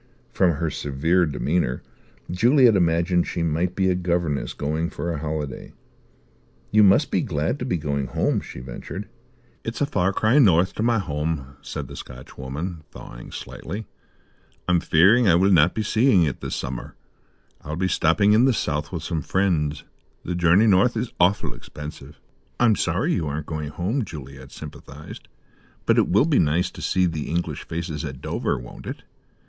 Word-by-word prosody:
From 90 -3 +3
her 80 +1 -2
severe 80 +6 +1
demeanour 75 -3 -1 0.5
Juliet 120 +4 +5
imagined 85 0 +2
she 85 - -2
might 85 +3 0
be 95 -1 +1
a 95 - +3
governess 85 -5 -1
going 80 +3 -2
for 85 - -4
a 75 - -4
holiday. 75 -3 -5 1.0
"You 110 - +5
must 100 -2 +5
be - - +2
glad - - -1
to - - -3
be 90 - 0
going 70 -3 -2
home," - - 0
she 60 - -9
ventured. 65 +10 -7 0.6
"It's 115 - -5
a 145 - +2
far 95 -9 +1
cry 110 +8 +3
north 95 - +4
to - - -4
my 115 0 +2
home," 75 -6 -3
said - - -6
the - - -10
Scotchwoman, 70 +6 -7
thawing - - -11
slightly. 105 +2 -7 0.8
"I'm 90 -1 +3
fearing 95 +9 +4
I 85 - +6
will 95 +3 +4
not 85 -1 +5
be 110 - -1
seeing 110 -3 +4
it 70 -6 -2
this - - -3
summer. 65 -2 -5 0.7
I'll 75 +2 -5
be 95 +3 0
stopping 90 +4 +3
in 115 +4 +5
the 135 - +4
south 75 -7 -2
with - - -4
some 80 - -2
friends. 80 -7 0 0.4
The 90 - -3
journey 90 +4 +4
north 105 +3 +4
is 115 +2 -3
awful' 90 +3 +2
expensive." 75 -1 -10 0.4
"I'm 115 -3 +5
sorry 90 +1 0
you 80 -5 -1
aren't 75 +1 -3
going 75 -2 -4
home," 100 - -1
Juliet 70 -7 -10
sympathized, 75 +3 -10 0.6
"but - - +4
it - - +3
will 105 +9 +4
be 160 -4 +3
nice 80 +4 +1
to - - -10
see 95 0 +2
the 80 -4 -3
English 85 +2 -3
faces 85 -2 -4
at 65 -4 -6
Dover, - - -2
won't - - -10
it? - - -6
85 Hz, 175 wpm, -23 LUFS, 75-95 Hz, 1.0 s, I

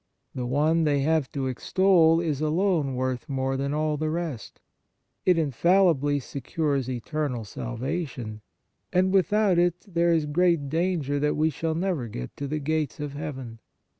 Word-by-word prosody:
The 125 -1 -3
one 155 +5 +2
they 145 -2 +2
have 155 -1 +1
to 135 -2 -2
extol 165 +5 +3
is 155 -4 -1
alone 155 -3 +1
worth 130 +1 -2
more 135 -1 -1
than 140 +1 -2
all 150 0 0
the 155 +1 -1
rest; 160 -9 -4 0.7
it 180 -2 +5
in 155 -4 +1
fallibly 160 -2 +3
secures 140 0 -2
eternal 125 -1 -3
salvation; 120 - -5 0.5
and 185 +1 +2
without 195 0 +3
it, 175 0 +3
there 170 -2 +2
is 160 -2 +2
great 165 -1 +2
danger 160 -3 0
that 150 +1 +1
we 155 +1 +2
shall 160 +2 -2
never 170 -8 -1
get 60 - -7
to 140 - -4
the 155 +3 -2
gates 150 -4 -2
of 145 -1 -4
heaven. 135 -6 -6
150 Hz, 160 wpm, -26 LUFS, 135-170 Hz, 0.7 s, it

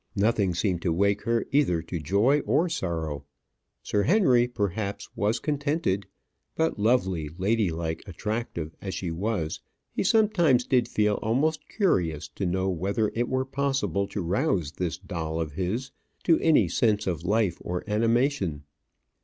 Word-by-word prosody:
Nothing 100 -3 +2
seemed 85 0 0
to 85 - 0
wake 100 +4 +2
her 115 0 +1
either 130 - +2
to 85 0 -4
joy 100 - +3
or 175 - +3
sorrow. 80 - -3 0.6
Sir 105 - +1
Henry, 130 - +4
perhaps, 100 -3 -3
was 105 +3 +1
contented; 145 - -1 0.5
but 160 -8 0
lovely, 95 -9 +1
ladylike, 90 -5 0
attractive 95 -4 -4
as 95 -2 -4
she 90 -1 -3
was, 85 -2 -2 0.3
he - - -1
sometimes 185 - +3
did 125 -3 +2
feel 105 -1 +1
almost 150 +7 0
curious 85 - 0
to 95 +5 -3
know 95 +2 0
whether 100 +4 0
it 120 +1 -1
were 130 0 0
possible 135 - -1
to 100 - -4
rouse 90 - 0
this 90 0 -3
doll 85 -4 -4
of 80 -2 -2
his 100 - -3 0.3
to 165 -2 +4
any 150 - +4
sense 105 +4 +1
of 85 -4 -2
life 100 -2 +1
or 90 0 -3
animation. 115 - +1
100 Hz, 145 wpm, -27 LUFS, 90-125 Hz, 0.6 s, Henry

